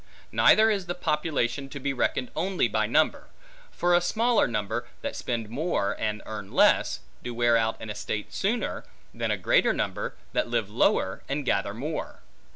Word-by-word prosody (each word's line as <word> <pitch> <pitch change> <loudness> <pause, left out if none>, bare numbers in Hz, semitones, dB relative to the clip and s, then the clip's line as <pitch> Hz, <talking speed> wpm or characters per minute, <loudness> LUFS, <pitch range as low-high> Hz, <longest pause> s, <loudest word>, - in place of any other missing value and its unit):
Neither 220 +1 +6
is 195 -4 -2
the 175 - -2
population 150 -5 -1
to 145 - -7
be 140 +1 -1
reckoned 125 0 -1
only 180 -5 +1
by 110 -1 0
number; 155 +7 +2 0.4
for 175 0 +1
a 175 - +5
smaller 230 +6 +2
number, 115 +1 -2 0.2
that - - -3
spend 115 -3 -3
more 120 - -1
and 105 -1 -2
earn 105 -3 -7
less, - - +3 0.2
do 120 -1 -5
wear 120 0 +3
out 115 -1 +1
an 110 - -6
estate 105 0 -4
sooner, 215 +2 -1 0.3
than - - -2
a - - +1
greater - - +3
number - - -3 0.2
that - - 0
live - - -1
lower, 95 0 +1
and 140 0 -2
gather 100 -3 0
more. 150 +7 -5
125 Hz, 170 wpm, -27 LUFS, 110-170 Hz, 0.4 s, Neither